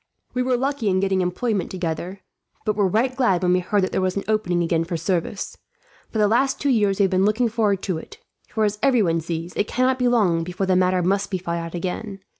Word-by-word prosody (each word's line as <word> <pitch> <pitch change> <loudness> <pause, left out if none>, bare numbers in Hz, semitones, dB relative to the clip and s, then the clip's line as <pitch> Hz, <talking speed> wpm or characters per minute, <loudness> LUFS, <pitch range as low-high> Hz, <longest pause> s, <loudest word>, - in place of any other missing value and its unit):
"We 250 - 0
were 250 0 +1
lucky 270 -4 -1
in 185 0 +2
getting 190 -1 +1
employment 195 +3 -1
together, 180 +1 -4 0.4
but 215 - +1
were 205 -2 +2
right 235 +7 +1
glad 195 -9 +2
when 180 0 +3
we 180 - +3
heard 195 +2 0
that 185 - -1
there - - 0
was 185 +1 0
an 200 - -2
opening 180 -5 +1
again 165 -1 +1
for 170 0 -3
service. 175 +3 -2 0.5
For - - -5
the 210 -1 +4
last 260 +5 +2
two 285 - 0
years 205 -5 +2
we 200 - +3
have 195 - +2
been 185 0 +2
looking 220 +4 +2
forward 210 -4 0
to 180 -5 -1
it; - - -12 0.3
for 220 - -1
as 210 0 0
everyone 205 -12 +3
sees, 165 +1 -5
it 205 - 0
cannot 255 +1 +1
be 250 - +2
long 195 -9 +2
before 180 +3 -3
the 185 -1 +2
matter 185 0 +2
must 195 +2 +1
be 190 - -1
fought 170 -1 -3
out 165 +1 -6
again. 195 +3 -4
195 Hz, 240 wpm, -23 LUFS, 180-220 Hz, 0.5 s, the